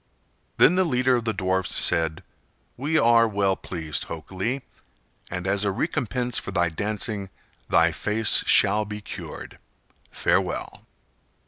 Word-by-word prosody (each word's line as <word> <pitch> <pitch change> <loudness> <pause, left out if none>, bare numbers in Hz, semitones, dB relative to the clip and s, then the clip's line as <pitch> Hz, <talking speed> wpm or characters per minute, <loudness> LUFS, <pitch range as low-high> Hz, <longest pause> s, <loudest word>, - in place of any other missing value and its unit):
Then 165 - +6
the 185 +1 +3
leader 130 -5 +2
of 120 -2 -2
the 110 - +1
dwarfs 95 -2 -1
said: 80 -1 +1 0.5
"We 150 +5 0
are 115 -2 +5
well 100 -2 +1
pleased, 80 -6 -4
Hok 80 +1 -8
Lee, 115 +9 -2 0.7
and 90 0 -4
as 100 +1 +1
a 100 - +1
recompense 125 - -1
for - - -7
thy 85 -3 +1
dancing 105 +2 -3 0.4
thy - - +4
face 110 +1 +2
shall 105 +2 +4
he 105 0 -6
cured. 105 - -9 0.5
Farewell." - - -1
105 Hz, 135 wpm, -24 LUFS, 95-120 Hz, 0.7 s, Then